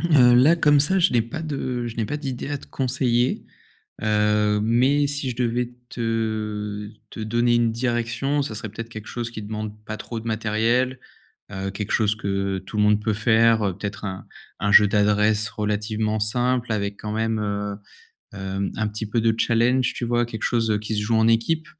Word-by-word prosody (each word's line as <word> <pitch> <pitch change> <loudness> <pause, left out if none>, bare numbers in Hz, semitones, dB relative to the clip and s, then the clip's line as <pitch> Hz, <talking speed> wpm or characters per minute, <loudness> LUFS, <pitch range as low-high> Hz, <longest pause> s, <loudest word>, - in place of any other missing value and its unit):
Heu, 135 -8 +5
là, 140 +8 +6
comme 150 -3 +4
ça, 190 +6 +2
je 180 -4 +3
n'ai 120 -2 +3
pas 135 +8 -6
de 130 -5 -3
je 115 - -7
n'ai 115 - 0
pas 150 - -3
d'idées 135 -3 -5
à 145 -1 -2
te - - -15
conseiller, 125 -2 0 0.6
heu, 105 -1 +2
mais 130 +6 +3
si 140 -2 -2
je 120 - -6
devais 120 0 -1 0.2
te 110 -2 -3 0.2
te - - -8
donner 120 +2 +1
une 115 -1 +2
direction, 120 +4 -1
ça 115 -6 -4
serait 110 0 -5
peut-être 115 +2 -7
quelque 110 -2 -9
chose 120 -1 -4
qui 110 -2 -7
demande 105 0 -5
pas 110 0 -5
trop 115 +2 -6
de 115 - -11
matériel, 115 +4 0 0.5
heu, 95 0 -3
quelque 100 +1 -4
chose 110 -1 +2
que 100 -2 -2
tout 95 +3 -8
le - - +4
monde 105 0 +3
peut 110 - 0
faire, 115 0 +3
heu, 95 -3 -1
peut-être 100 0 -6
un 95 -1 -5 0.3
un 105 -1 +1
jeu 105 0 +8
d'adresse 105 +1 +2
relativement 105 0 -1
simple 120 +2 +1
avec 100 -1 -2
quand 105 - -4
même, 110 0 0
heu, 100 -1 -2 0.6
hem, 95 0 -3
un 110 -1 0
petit 110 +1 -5
peu 110 +3 0
de 115 0 +2
challenge, 120 +3 +2
tu 120 - -4
vois? 120 0 +1
Quelque 110 -2 -7
chose, 115 -2 +1
heu, 105 - +2
qui 105 +1 -4
se 105 - 0
joue 110 +2 +1
en 110 0 +4
équipe, 155 +8 +1
110 Hz, 200 wpm, -23 LUFS, 105-120 Hz, 0.6 s, jeu